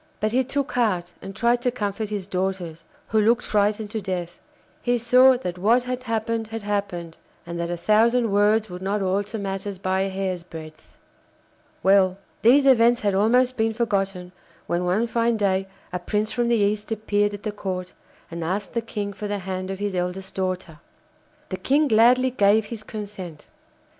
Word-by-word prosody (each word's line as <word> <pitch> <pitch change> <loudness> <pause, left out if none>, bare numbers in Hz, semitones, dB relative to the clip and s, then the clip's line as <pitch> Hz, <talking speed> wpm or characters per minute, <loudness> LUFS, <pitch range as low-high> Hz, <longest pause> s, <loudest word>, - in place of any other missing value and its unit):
But 215 +1 0
he 255 +3 +2
took 275 +2 -2
heart 185 -8 0
and 195 0 -8
tried 235 +2 +2
to 250 - +1
comfort 210 -3 -3
his 205 -3 -3
daughters, 180 -4 -3 0.2
who 220 - +3
looked 235 +3 +3
frightened 210 0 0
to 220 - -3
death. 180 -2 -4 0.4
He 245 0 +1
saw 250 +2 +5
that 180 -7 -5
what 230 +6 +3
had 250 0 -4
happened 225 0 -1
had 225 -1 -6
happened, 195 -5 -3 0.3
and 170 0 -5
that 170 0 -2
a 175 - -2
thousand 225 +4 +3
words 210 +2 +3
would 180 -1 -8
not 200 +1 -1
alter 200 +4 -1
matters 195 -1 -4
by 190 0 0
a 195 - 0
hair's 190 -2 -3
breadth. 155 -2 -12 0.9
Well, 190 -1 +4 0.2
these 270 +5 +6
events 240 -2 +5
had 205 -2 +1
almost 245 +6 +3
been 220 0 +1
forgotten 195 -5 -1 0.3
when 175 +1 -1
one 190 +6 +2
fine 235 0 +1
day 195 -2 +1 0.3
a 180 - -1
prince 210 +4 -1
from 240 -1 0
the 235 - +3
East 210 0 0
appeared 205 -1 0
at 205 - -12
the 215 - -2
Court 185 -3 -5 0.4
and 170 0 -4
asked 190 +5 -3
the 235 - 0
King 205 -3 -4
for 210 +1 -5
the 205 0 -2
hand 185 -1 -4
of 195 - -3
his 205 0 -2
eldest 180 +1 -3
daughter. 185 -4 -3 0.7
The 185 - -3
King 290 +7 +2
gladly 250 +2 +5
gave 210 -2 +3
his 225 0 -7
consent. 200 -7 -8
205 Hz, 185 wpm, -24 LUFS, 185-225 Hz, 0.9 s, these